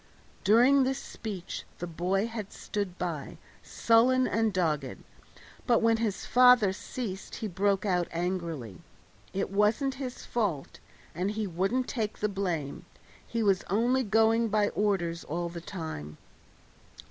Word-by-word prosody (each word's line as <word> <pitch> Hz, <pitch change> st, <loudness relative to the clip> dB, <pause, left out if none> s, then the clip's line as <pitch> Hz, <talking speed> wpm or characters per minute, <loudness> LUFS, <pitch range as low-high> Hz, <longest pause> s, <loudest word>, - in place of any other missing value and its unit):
During 245 Hz, +7 st, +6 dB
this 265 Hz, +1 st, 0 dB
speech 205 Hz, -9 st, -6 dB
the 175 Hz, -, -4 dB
boy 180 Hz, +4 st, 0 dB
had 225 Hz, -3 st, -6 dB
stood 200 Hz, -4 st, -4 dB
by, 165 Hz, -5 st, -4 dB, 0.2 s
sullen 250 Hz, +3 st, +3 dB
and 225 Hz, -1 st, +1 dB
dogged, 155 Hz, -8 st, -1 dB, 0.6 s
but 235 Hz, -2 st, +3 dB
when 225 Hz, 0 st, +4 dB
his 220 Hz, -4 st, -2 dB
father 250 Hz, -5 st, +6 dB
ceased 195 Hz, -2 st, -6 dB
he 225 Hz, -, -4 dB
broke 195 Hz, +1 st, 0 dB
out 180 Hz, -3 st, +1 dB
angrily. 165 Hz, -, -3 dB, 0.5 s
It 195 Hz, 0 st, -2 dB
wasn't 215 Hz, +7 st, +2 dB
his 255 Hz, -2 st, -6 dB
fault, 195 Hz, -12 st, -2 dB, 0.3 s
and 180 Hz, +4 st, -1 dB
he 215 Hz, +1 st, -2 dB
wouldn't 195 Hz, +8 st, 0 dB
take 220 Hz, -5 st, -3 dB
the 210 Hz, -, 0 dB
blame; 175 Hz, -8 st, -3 dB, 0.4 s
he 230 Hz, -1 st, -1 dB
was 195 Hz, -3 st, +2 dB
only 240 Hz, +7 st, +2 dB
going 225 Hz, +1 st, +3 dB
by 210 Hz, -1 st, +2 dB
orders 175 Hz, -5 st, 0 dB
all 170 Hz, +2 st, -3 dB
the 170 Hz, 0 st, -7 dB
time. 160 Hz, -, -6 dB
200 Hz, 135 wpm, -29 LUFS, 175-225 Hz, 0.6 s, During